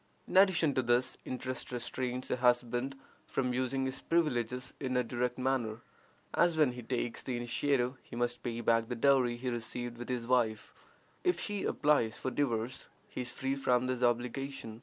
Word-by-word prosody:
In - - -6
addition 185 -6 +5
to 130 - +2
this, 120 +1 +2
interest 130 0 -4
restrains 125 +1 -3
a - - +1
husband 125 +1 +2 0.3
from 125 -2 0
using 130 +1 0
his 130 0 -3
privileges 125 -6 0
in 130 -2 -1
a 125 - +3
direct 125 +1 -1
manner, 125 -4 0 0.5
as 170 -1 +3
when 150 -5 +5
he 125 0 -7
takes 120 -1 -2
the 125 -2 -3
initiative 125 +1 0
he - - -11
must 120 0 -1
pay 120 -1 -3
back 115 0 +3
the 120 - -3
dowry 125 -1 +3
he 125 +1 -2
received 120 +1 -4
with 120 - -6
his 125 -2 -1
wife. 115 -4 +1 0.5
If 360 -1 +2
she 205 -2 -2
applies 140 -7 +2
for 130 - -3
divorce, 125 -3 -1 0.2
he - - -4
is 120 -1 -4
free 135 +1 -1
from 125 -2 +2
this 125 -1 -1
obligation. 120 -1 -1
125 Hz, 180 wpm, -32 LUFS, 120-135 Hz, 0.5 s, addition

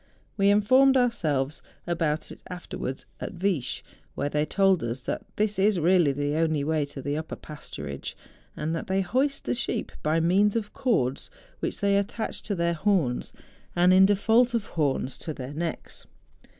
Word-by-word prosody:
We 200 -1 +3
informed 255 +7 +5
ourselves 155 - 0 0.2
about 165 -3 -1
it - - -11
afterwards 175 -7 -5
at - - -5
Viesch, 170 -9 -1 0.3
where 145 - -1
they 150 +1 0
told 195 -3 +3
us 120 +2 -3
that - - -3
this 210 -1 0
is 200 -1 +3
really 170 -2 +4
the 145 +2 -1
only 160 -3 +1
way 155 0 +1
to 140 -1 -9
the 145 +1 -1
upper 160 +1 -4
pasturage; 75 - -7 0.4
that 160 +2 -3
they 190 0 +1
hoist 265 +9 0
the - - 0
sheep 235 -2 -2
by 155 +2 +2
means 195 +6 +3
of 210 -3 -2
cords, 140 - 0 0.3
which - - -3
they 200 0 +3
attach 215 +2 -4
to 205 - -3
their 170 -1 +1
horns, 165 -8 0 0.4
and 180 +1 +5
in 190 +1 +7
default 225 +4 +3
of 225 -3 0
horns, 135 -4 -1
to 155 -3 -5
their 130 +2 -6
necks. 165 +2 -5
175 Hz, 165 wpm, -27 LUFS, 150-205 Hz, 0.4 s, in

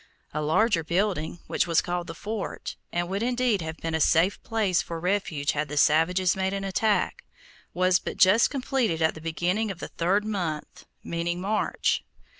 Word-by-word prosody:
A 150 - -1
larger 165 +4 +2
building, 175 -1 -1
which - - 0
was 165 -1 +3
called 175 -1 -2
the 165 - -7
fort, 210 +3 -5 0.2
and 175 0 -1
would 195 +3 -2
indeed 245 -4 +1
have 160 0 -5
been 165 0 -4
a 160 - +1
safe 175 +7 +3
place 210 -6 +1
for 165 -1 -6
refuge 180 -5 0
had 150 +1 -2
the 150 - -5
savages 175 +5 +3
made 190 0 -1
an 195 0 -3
attack, 205 +2 0 0.5
was 185 0 +3
but - - -6
just 205 +5 +5
completed 255 - 0
at 160 - +3
the 160 - -11
beginning 175 +7 -1
of 190 - -5
the - - -7
third 195 +5 +1
month, 175 -8 -4 0.2
meaning 170 +1 -2
March. 210 +3 0
180 Hz, 180 wpm, -26 LUFS, 165-205 Hz, 0.5 s, just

